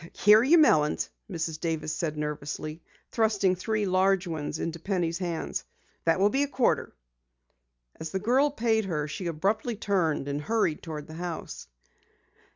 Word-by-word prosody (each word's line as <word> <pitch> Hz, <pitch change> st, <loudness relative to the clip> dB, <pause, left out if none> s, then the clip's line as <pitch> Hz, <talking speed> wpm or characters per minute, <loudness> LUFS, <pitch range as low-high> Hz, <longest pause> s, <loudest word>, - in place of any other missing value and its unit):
"Here 210 Hz, +2 st, +6 dB
are -, -, +2 dB
your 310 Hz, +7 st, +6 dB
melons," 150 Hz, -, +3 dB, 0.2 s
Mrs. 160 Hz, -4 st, -3 dB
Davis 160 Hz, -2 st, -2 dB
said 155 Hz, -3 st, -3 dB
nervously, 150 Hz, +1 st, -4 dB, 0.3 s
thrusting 210 Hz, -5 st, +2 dB
three 215 Hz, +3 st, -1 dB
large 190 Hz, 0 st, +2 dB
ones 155 Hz, -3 st, -4 dB
into 165 Hz, +1 st, -4 dB
Penny's 170 Hz, -2 st, -1 dB
hands. 170 Hz, -3 st, -3 dB, 0.4 s
"That 165 Hz, +2 st, +3 dB
will 200 Hz, +2 st, +4 dB
be 270 Hz, -, +1 dB
a 285 Hz, -, +2 dB
quarter." 265 Hz, -3 st, 0 dB, 1.0 s
As 160 Hz, -, -5 dB
the 190 Hz, -, -2 dB
girl 255 Hz, +8 st, +3 dB
paid 225 Hz, -5 st, +1 dB
her, 155 Hz, -5 st, -2 dB
she 175 Hz, +4 st, -5 dB
abruptly 205 Hz, +8 st, -1 dB
turned 180 Hz, -9 st, 0 dB
and 145 Hz, +1 st, -2 dB
hurried 215 Hz, -3 st, 0 dB
toward 155 Hz, -3 st, -6 dB
the 155 Hz, -, -11 dB
house. 170 Hz, -, -6 dB
180 Hz, 160 wpm, -28 LUFS, 155-215 Hz, 1.0 s, Here